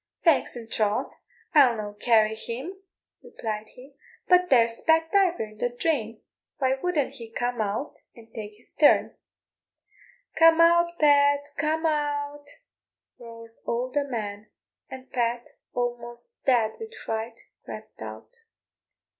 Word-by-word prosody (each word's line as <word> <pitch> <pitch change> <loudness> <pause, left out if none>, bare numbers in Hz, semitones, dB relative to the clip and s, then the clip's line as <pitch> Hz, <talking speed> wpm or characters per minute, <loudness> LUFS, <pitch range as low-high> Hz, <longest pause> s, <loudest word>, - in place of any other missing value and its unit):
"Faix 330 -7 +3
and 230 -2 -9
troth, 210 -1 0 0.4
I'll 270 -6 +6
no 210 -1 -5
carry 220 0 +3
him," 240 +10 -6 0.5
replied 215 -1 -5
he, 260 +3 -14 0.3
"but 360 0 +4
there's 230 -3 +3
Pat 325 0 +2
Diver 375 - +3
in 215 0 -11
the 245 - 0
drain, 240 -4 -2 0.3
why 260 -1 +2
wouldn't 295 0 -1
he 235 -5 -10
come 240 0 -2
out 215 +7 -2 0.2
and 230 - -14
tak' 215 -2 -7
his 240 - -26
turn?" 295 - +4 1.2
"Come 330 0 +6
out, 340 +1 +4
Pat, 285 -1 +4
come 315 +2 -1
out," 290 -1 -1 0.7
roared 230 -1 -12
all 245 +2 -1
the 290 +1 +1
men, 210 -5 -5 0.4
and 260 0 -10
Pat, 240 -1 -1 0.2
almost 240 - -4
dead 235 -5 +2
with 450 0 -8
fright, 225 +1 -4 0.2
crept - - -10
out. - - -9
250 Hz, 130 wpm, -26 LUFS, 230-300 Hz, 1.2 s, I'll